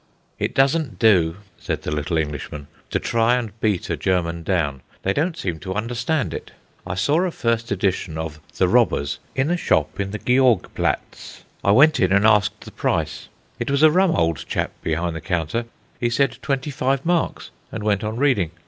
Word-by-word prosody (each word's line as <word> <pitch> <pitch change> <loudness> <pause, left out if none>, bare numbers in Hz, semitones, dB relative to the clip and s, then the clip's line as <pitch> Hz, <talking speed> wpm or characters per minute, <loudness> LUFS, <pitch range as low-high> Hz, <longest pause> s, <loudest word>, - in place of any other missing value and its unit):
"It - - -2
doesn't 135 0 +2
do," 90 -8 +4 0.2
said - - -3
the - - -3
little 75 +2 -1
Englishman, 75 -1 -4 0.2
"to - - 0
try 115 +1 +2
and 120 -4 -2
beat 105 -5 0
a - - -1
German 85 -2 0
down. 80 -6 -1 0.2
They 95 - +1
don't 165 - 0
seem 85 - -3
to 95 +4 -5
understand 120 - -1
it. - - -6 0.4
I 95 - -3
saw 145 - +2
a 185 - +1
first 115 -7 -1
edition 95 -4 -1
of 80 -1 -5 0.2
The - - +3
Robbers 70 -1 +2 0.2
in 135 +5 +1
a 175 - +2
shop 80 - 0
in 100 0 -1
the 110 - -4
Georg 125 -2 +3
Platz. - - -3 0.2
I - - +2
went 145 +10 +6
in 95 - +3
and 100 +2 +4
asked 105 -3 +3
the - - -11
price. 80 -1 -2 0.3
It - - -2
was 140 +2 +2
a 155 - +8
rum 185 +1 +3
old 80 -4 +1
chap - - -1
behind 85 +1 -1
the 80 - -5
counter. 85 +9 -1 0.3
He 120 - +1
said: 125 0 +1
'Twenty 140 +1 -2
five 135 0 0
marks,' 175 -1 0 0.2
and 110 - -5
went 105 0 +1
on 110 +1 -2
reading. 125 - +2
105 Hz, 195 wpm, -22 LUFS, 85-135 Hz, 0.4 s, a